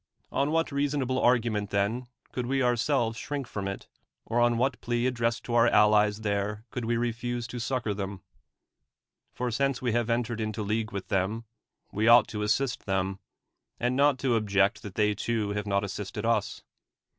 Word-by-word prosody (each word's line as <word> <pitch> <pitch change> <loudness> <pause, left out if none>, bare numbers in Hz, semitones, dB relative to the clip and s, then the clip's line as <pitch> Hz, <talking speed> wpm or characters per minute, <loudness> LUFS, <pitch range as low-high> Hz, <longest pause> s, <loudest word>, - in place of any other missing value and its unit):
On 140 +1 +1
what 165 +1 +1
reasonable 140 -2 0
argument, 115 -4 +2
then, 105 +5 0 0.2
could 125 -1 -3
we 135 0 +1
ourselves 120 -1 +1
shrink 145 -2 -4
from 100 -4 -4
it; 100 - -6 0.4
or 115 +2 0
on 120 -1 +3
what 130 +1 0
plea 120 0 0
ad 130 - +1
dressed 115 -1 -1
to 120 - -5
our 120 0 +5
allies 105 -1 +4
there 105 +1 -2
could 125 - -4
we 115 +1 +1
refuse 120 0 -2
to 120 +1 -6
succor 120 -3 -1
them? 100 -2 -5 1.1
For 125 -1 -3
since 135 +2 0
we 125 -2 -1
have 120 0 0
entered 115 -1 -1
into 110 0 -3
league 110 +2 -1
with 100 -2 -6
them, 105 +4 0 0.5
we 110 +2 0
ought 115 -1 +7
to 105 - -4
assist 120 +5 0
them, 95 0 -1 0.6
and 120 +1 0
not 140 0 +4
to 130 -1 0
object 100 -1 +2
that 100 -3 -9
they 105 -1 +2
too 110 -1 -1
have 105 0 -3
not 100 0 +1
assisted 100 -1 -5
us. - - 0
115 Hz, 180 wpm, -28 LUFS, 105-125 Hz, 1.1 s, ought